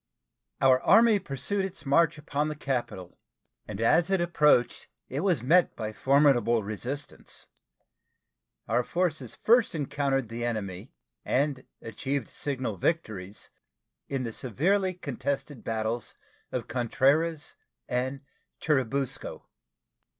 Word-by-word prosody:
Our 130 -1 +5
Army 225 0 +6
pursued 190 +7 -2
its 190 -5 -6
march 165 +3 +3
upon 150 0 -2
the 155 - -3
capital, 120 -11 -4 0.5
and 105 -1 -6
as 160 +10 +3
it 195 -1 +2
approached 150 -7 +2 0.2
it 135 - -3
was 170 - +1
met 175 +7 +4
by 110 -1 -4
formidable 130 -4 +3
resistance. 125 +8 -5 1.2
Our 120 +3 +2
forces 155 -6 -2
first 235 -4 +3
encountered 140 -3 -1
the 115 +1 -4
enemy, 105 -2 -4 0.3
and 135 -1 0 0.2
achieved 135 +2 -3
signal 130 -7 -3
victories 105 - -2 0.6
in 135 -2 -2
the 115 -2 -4
severely 185 - 0
contested 140 -3 -4
battles 110 +1 -2 0.4
of 125 -2 -3
Contreras 140 +7 +1 0.3
and 130 +2 -2 0.4
Churubusco. 135 -3 -1
135 Hz, 110 wpm, -28 LUFS, 120-155 Hz, 1.2 s, Army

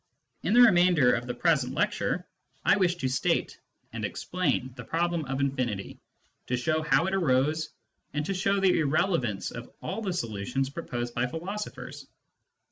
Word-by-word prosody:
In 215 - +1
the 245 - +8
remainder 175 - +6
of 120 +1 -2
the 125 - -2
present 135 -3 +1
lecture, 205 -3 0 0.4
I 190 - +6
wish 180 -3 +2
to 150 -7 -2
state 130 0 0 0.3
and - - -5
explain 140 -8 -1
the 120 - -8
problem 170 +3 -1
of 135 +1 -3
infinity, 125 -8 -2 0.5
to 125 - 0
show 155 +6 0
how 150 0 +3
it 190 - -1
arose, 155 -2 +1 0.4
and 150 0 -2
to 195 - -1
show 195 +1 +1
the 190 -3 +3
irrelevance 145 - 0
of - - -8
all 200 +4 -4
the 195 -4 -2
solutions 120 - -2
proposed 120 -6 -4
by 120 +2 0
philosophers. 190 +9 -6
155 Hz, 160 wpm, -28 LUFS, 125-180 Hz, 0.5 s, the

